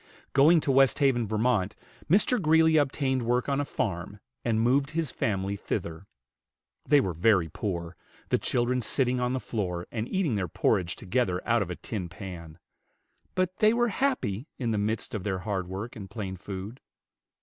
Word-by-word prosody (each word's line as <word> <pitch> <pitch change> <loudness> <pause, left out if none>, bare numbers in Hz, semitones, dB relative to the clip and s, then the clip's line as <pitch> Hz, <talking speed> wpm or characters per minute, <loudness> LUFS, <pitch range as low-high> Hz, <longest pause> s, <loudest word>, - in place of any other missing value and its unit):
Going 155 +4 +6
to 140 - +1
Westhaven, 135 -3 +3
Vt., 110 -2 +1 0.4
Mr. 210 +6 +4
Greeley 160 0 +4
obtained 135 -2 +1
work 120 +1 0
on 140 0 +1
a - - 0
farm, 100 -4 -3 0.2
and 115 -2 +1
moved 135 +5 +2
his 160 -3 -2
family 100 -2 -1
thither. 85 -2 -4 0.8
They 145 -1 +6
were 95 -9 -1
very 85 0 +3
poor, 85 -1 -4 0.3
the - - +2
children 125 +1 0
sitting 125 +1 +1
on 125 0 0
the 130 - 0
floor 90 -8 -3
and 115 0 -3
eating 190 -9 0
their 100 -4 -1
porridge 85 +1 +1
together 95 -3 0
out 120 -1 +3
of 95 - -2
a 90 - -3
tin 95 -3 -5
pan; 85 -3 -9 0.8
but 185 0 0
they 215 +1 +5
were 240 0 +2
happy 185 - -1
in 120 -3 -1
the 105 - 0
midst 110 +5 -2
of 105 -4 -3
their 95 -2 -1
hard 95 -1 -3
work 100 +8 -6
and 100 -4 -8
plain 100 -3 -5
food. 95 +5 -7
115 Hz, 170 wpm, -28 LUFS, 95-135 Hz, 0.8 s, Going